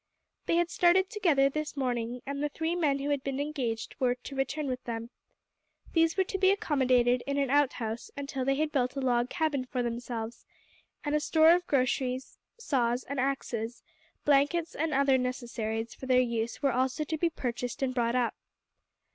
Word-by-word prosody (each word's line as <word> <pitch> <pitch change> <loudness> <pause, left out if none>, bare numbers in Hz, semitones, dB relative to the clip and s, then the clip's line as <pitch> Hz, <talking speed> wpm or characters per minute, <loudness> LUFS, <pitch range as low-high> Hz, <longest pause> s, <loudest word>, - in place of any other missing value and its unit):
They - - +2
had 345 0 +2
started 370 +3 +4
together 330 -11 +3
this 305 +1 -4
morning, 245 -2 -2
and 280 +1 -4
the 295 - 0
three 320 +3 -2
men 300 -5 +2
who 280 +1 -2
had 285 -2 0
been 275 0 -3
engaged 265 -7 -3
were 250 -1 +2
to 250 +2 -9
return 280 +3 -1
with 255 -2 -3
them. 230 0 -5 0.8
These 330 +1 +3
were 380 - +4
to 390 +1 -4
be 380 0 +5
accommodated 255 - +2
in 280 0 -1
an 275 -2 +1
outhouse 245 -6 0
until 275 -2 -3
they 275 +1 +2
had 305 +2 0
built 250 -2 0
a - - -2
log 245 -2 +1
cabin 300 -5 0
for 250 -1 -2
themselves, 235 -1 -4 0.6
and 295 - -1
a 300 - +3
store 315 +2 +5
of 355 +1 +2
groceries, 255 -1 0 0.2
saws 250 - 0
and 280 0 -4
axes, 245 -3 -2 0.4
blankets, 295 +5 +3
and 320 +1 -1
other 275 -1 +3
necessaries 235 -3 -3
for 260 - -9
their 255 -1 +5
use 235 0 -1
were 275 - +4
also 260 +4 0
to 315 +1 -3
be 340 - +2
purchased 245 -3 -4
and 255 -1 0
brought 235 -1 +1
up. 245 -2 +1
270 Hz, 185 wpm, -29 LUFS, 245-300 Hz, 0.8 s, be